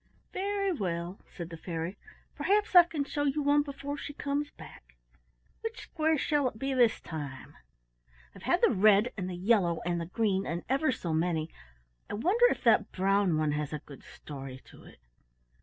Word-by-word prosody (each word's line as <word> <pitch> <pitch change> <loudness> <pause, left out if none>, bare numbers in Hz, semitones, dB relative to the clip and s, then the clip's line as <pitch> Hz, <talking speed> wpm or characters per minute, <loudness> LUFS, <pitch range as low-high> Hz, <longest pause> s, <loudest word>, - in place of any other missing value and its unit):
"Very 395 0 0
well," 180 - -3
said 170 -1 -7
the 165 - -7
fairy. 165 +2 -4 0.4
"Perhaps 415 +1 +1
I 350 -1 +10
can 310 -4 -2
show 290 +1 -3
you 285 +1 0
one 290 +1 +4
before 285 0 -5
she 290 - -6
comes 290 0 -2
back. - - -14 0.7
Which 450 0 -5
square 315 -1 0
shall 290 -1 +1
it 220 - -15
be 270 +4 -2
this 240 -3 +3
time?" 145 -5 -7 0.8
"I've - - -13
had - - +1
the - - +6
red, 210 +4 +4
and 185 -2 -4
the 180 - -4
yellow, 180 -3 +2
and 175 -1 0
the 165 - -5
green, 195 -1 0
and 170 +1 -3
ever 275 +3 +2
so 170 -9 -3
many: 160 -1 0 0.6
I - - -3
wonder 390 - +4
if - - -3
that - - +4
brown 195 -2 +2
one 155 -1 +1
has 150 0 -2
a 150 - -3
good 140 -3 -12
story 135 -3 -9
to - - -16
it." - - -15
205 Hz, 185 wpm, -30 LUFS, -, 0.8 s, I